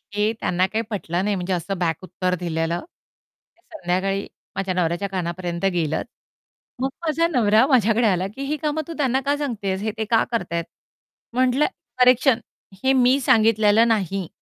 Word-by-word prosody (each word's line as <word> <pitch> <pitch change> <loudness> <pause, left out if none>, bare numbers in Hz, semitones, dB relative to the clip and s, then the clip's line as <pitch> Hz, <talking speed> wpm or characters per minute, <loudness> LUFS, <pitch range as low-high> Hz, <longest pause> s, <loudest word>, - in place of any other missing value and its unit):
हे 210 +1 +2
त्यांना 180 +1 +1
काही 220 +3 -1
पटलं 180 -3 -2
नाही, 205 -1 0
म्हणजे 185 0 -2
असं 185 +2 -3
बॅक 165 -3 0
उत्तर 180 0 -2
दिलेलं. 170 0 -1 0.8
ते - - -31 0.2
संध्याकाळी 195 - -1 0.3
माझ्या 190 -1 -1
नवऱ्याच्या 180 +2 -1
कानापर्यंत 175 -1 -3
गेलं. 160 -3 0 0.8
मग 265 - +1 0.2
माझा 330 +2 +2
नवरा 225 -5 +4
माझ्याकडे 230 -3 +3
आला, 185 -1 +1
की 275 - -7
ही 300 +2 -2
कामं 305 +1 0
तू 335 - -5
त्यांना 265 -2 +1
का 285 +1 +2
सांगतेस? 205 -9 -3
हे 215 0 -1
ते 220 - -1
का 225 +1 +3
करत 180 -7 -2
आहेत? 170 0 -1 0.7
म्हटलं, 255 +3 +2 0.4
करेक्शन 250 0 +5 0.4
हे 265 0 +4
मी 255 +1 +4
सांगितलेलं 220 -1 +4
नाही. 195 -5 0
205 Hz, 160 wpm, -22 LUFS, 180-250 Hz, 0.8 s, करेक्शन